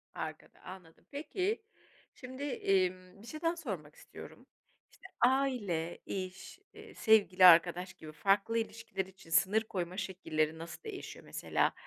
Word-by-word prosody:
Arkada, -, -, -7 dB
anladım. 180 Hz, -3 st, -12 dB
Peki, 370 Hz, +9 st, -2 dB, 0.5 s
şimdi, 260 Hz, +2 st, -8 dB
emm, 185 Hz, -7 st, 0 dB
bir 225 Hz, -, -13 dB
şey 310 Hz, +4 st, -7 dB
daha 330 Hz, +1 st, +1 dB
sormak 185 Hz, -, -6 dB
istiyorum. -, -, -12 dB, 0.5 s
İşte, -, -, -14 dB
aile, 240 Hz, -10 st, +1 dB
iş, 190 Hz, -, -6 dB
eee, -, -, -12 dB
sevgili, 200 Hz, -4 st, +5 dB
arkadaş 175 Hz, +1 st, +6 dB
gibi 155 Hz, -1 st, -11 dB
farklı 200 Hz, +8 st, +2 dB
ilişkiler 225 Hz, -4 st, -3 dB
için 190 Hz, -3 st, -17 dB
sınır 195 Hz, +6 st, +4 dB
koyma 185 Hz, -4 st, -4 dB
şekilleri 160 Hz, -5 st, -1 dB
nasıl 165 Hz, -, -9 dB
değişiyor? 425 Hz, -4 st, -8 dB
Mesela -, -, 0 dB
190 Hz, 130 wpm, -33 LUFS, 175-245 Hz, 0.5 s, arkadaş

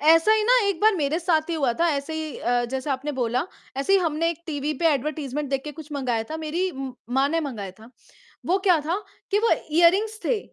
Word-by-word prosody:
ऐसा 325 Hz, +7 st, +6 dB
ही 435 Hz, -, +3 dB
ना -, -, +5 dB
एक 375 Hz, -4 st, -1 dB
बार 435 Hz, 0 st, +5 dB
मेरे 300 Hz, +1 st, 0 dB
साथ 330 Hz, -3 st, +1 dB
ही -, -, 0 dB
हुआ 275 Hz, -6 st, +1 dB
था, 340 Hz, -, +4 dB
ऐसे 280 Hz, +1 st, -3 dB
ही 310 Hz, -4 st, -4 dB
अ, 245 Hz, 0 st, +1 dB
जैसा 265 Hz, +2 st, -2 dB
आपने 280 Hz, +3 st, -3 dB
बोला, 250 Hz, +3 st, -1 dB, 0.3 s
ऐसे 275 Hz, +8 st, 0 dB
ही 390 Hz, -, +7 dB
हमने 330 Hz, -1 st, 0 dB
एक 335 Hz, 0 st, -8 dB
टीवी 295 Hz, -1 st, -2 dB
पे -, -, +5 dB
एडवर्टाइज़मेंट 290 Hz, 0 st, -3 dB
देख 270 Hz, -1 st, 0 dB
के 300 Hz, -, -5 dB
कुछ 305 Hz, 0 st, -11 dB
मँगाया 250 Hz, -5 st, -1 dB
था, 315 Hz, -, -3 dB
मेरी 325 Hz, +4 st, -2 dB
म 270 Hz, -2 st, -5 dB, 0.3 s
माँ 275 Hz, +1 st, +3 dB
ने 330 Hz, +2 st, 0 dB
मँगाया 230 Hz, -11 st, -5 dB
था। 225 Hz, +2 st, -14 dB, 0.6 s
वो 370 Hz, -, +3 dB
क्या 350 Hz, -3 st, +5 dB
था? 340 Hz, +4 st, 0 dB, 0.3 s
कि 410 Hz, -, +3 dB
वो 455 Hz, +1 st, +2 dB, 0.2 s
ईयररिंग्स 395 Hz, +6 st, +4 dB
थे। 470 Hz, -, +1 dB
310 Hz, 235 wpm, -24 LUFS, 275-340 Hz, 0.6 s, ही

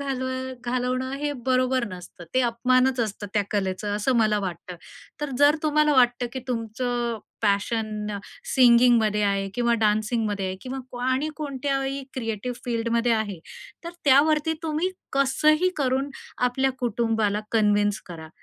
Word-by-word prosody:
घालव 265 Hz, -2 st, -2 dB, 0.4 s
घालवणं 255 Hz, +1 st, -1 dB
हे 295 Hz, 0 st, -1 dB
बरोबर 255 Hz, -1 st, +2 dB
नसतं. 180 Hz, -1 st, -10 dB
ते 260 Hz, -, +4 dB
अपमानच 255 Hz, +2 st, +2 dB
असतं 210 Hz, -2 st, -3 dB
त्या 205 Hz, -, +3 dB
कलेचं 205 Hz, 0 st, -1 dB
असं 250 Hz, +5 st, +1 dB
मला 215 Hz, -2 st, +3 dB
वाटतं. 180 Hz, -1 st, -6 dB, 0.4 s
तर 295 Hz, -1 st, -3 dB
जर 290 Hz, +2 st, +5 dB
तुम्हाला 300 Hz, 0 st, +3 dB
वाटतं, 245 Hz, -1 st, +3 dB
की 260 Hz, -, -4 dB
तुमचं, 235 Hz, 0 st, -2 dB, 0.2 s
पॅशन 215 Hz, +1 st, 0 dB, 0.5 s
सिंगिंगमध्ये 235 Hz, -4 st, +5 dB
आहे 195 Hz, -1 st, 0 dB
किंवा 235 Hz, -1 st, +2 dB
डान्सिंगमध्ये 215 Hz, -2 st, +1 dB
आहे 185 Hz, -, -4 dB
किंवा 260 Hz, +1 st, -5 dB
क्व 245 Hz, -, -8 dB
आणि 260 Hz, +4 st, +1 dB
कोणत्याही 275 Hz, -1 st, -2 dB
क्रिएटिव्ह 240 Hz, 0 st, -4 dB
फील्डमध्ये 235 Hz, 0 st, 0 dB
आहे, 215 Hz, -4 st, -1 dB, 0.5 s
तर 340 Hz, -, -4 dB
त्यावरती 300 Hz, +3 st, +4 dB
तुम्ही 320 Hz, +3 st, -1 dB, 0.2 s
कसंही 305 Hz, +5 st, +3 dB
करून 270 Hz, 0 st, 0 dB, 0.4 s
आपल्या 265 Hz, +1 st, 0 dB
कुटुंबाला 225 Hz, -3 st, 0 dB
कन्विन्स 205 Hz, -2 st, +2 dB
करा 160 Hz, -2 st, -9 dB
245 Hz, 135 wpm, -25 LUFS, 215-265 Hz, 0.5 s, जर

